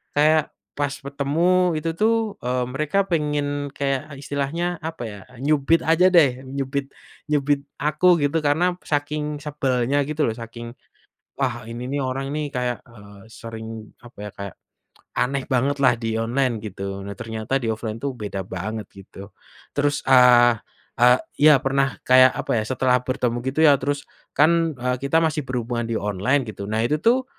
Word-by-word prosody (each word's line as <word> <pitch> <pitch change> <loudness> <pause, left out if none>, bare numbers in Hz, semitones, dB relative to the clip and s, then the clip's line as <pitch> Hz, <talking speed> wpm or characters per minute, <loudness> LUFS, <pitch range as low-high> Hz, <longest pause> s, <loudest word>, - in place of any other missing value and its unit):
kayak 155 +1 +3 0.2
pas 145 -1 -1
ketemu 160 +6 +1
itu 155 +2 -2
tuh, 225 -1 +1
eee, 125 +1 -1
mereka 155 +8 +1
pengen 145 -2 -1
kayak 140 +1 -2
istilahnya 145 +5 -3
apa 160 -4 -6
ya, 105 -3 -7 0.2
nyubit 150 +2 +2
aja 165 +3 +4
deh, 135 -8 +3
nyubit 135 +1 -3 0.4
nyubit 145 -1 +1 0.2
aku 155 +4 +1 0.2
gitu 145 +3 +1
karena 160 +4 +2 0.2
saking 150 0 -1
sebelnya 135 -2 0
gitu 155 0 -1
loh 115 - +1
saking, 115 0 -8 0.7
"Wah 120 -4 -2
ini 120 +2 -6
nih 140 +1 -1
orang 135 +1 -3
nih 150 -1 -2
kayak, 125 -2 -2
eee, 105 -4 -15
sering 110 -1 -8
apa 120 -2 -16
ya, 105 - -6
kayak, 100 -2 -8 0.6
aneh 135 +2 0
bangetlah 135 0 +2
di 115 -1 -2
online," 120 0 0
gitu. 100 -2 -6
Nah, 100 - -6
ternyata 110 +4 -3
di 115 - 0
offline 110 0 -5
itu 140 -1 -1
beda 105 -5 -5
banget 105 +4 -5
gitu, 100 +1 -12 0.4
terus, 145 0 0
eee 120 -3 +6 0.4
eee, 125 +1 +6 0.2
ya 150 0 +8
pernah 135 0 +1
kayak 130 0 +7
apa - - -2
ya, - - -2
setelah 125 -1 +2
bertemu 125 -2 -1
gitu 155 +4 +2
ya 145 - +7
terus 145 0 -2 0.3
kan, 165 0 +3
eee, 125 +1 -1
kita 140 +4 +2
masih 155 -1 0
berhubungan 120 -2 -2
di 115 - 0
online 105 +8 0
gitu, 100 -2 -7
nah 110 - 0
itu 150 +4 0
tuh, 250 +3 +3
135 Hz, 160 wpm, -23 LUFS, 120-150 Hz, 0.7 s, ya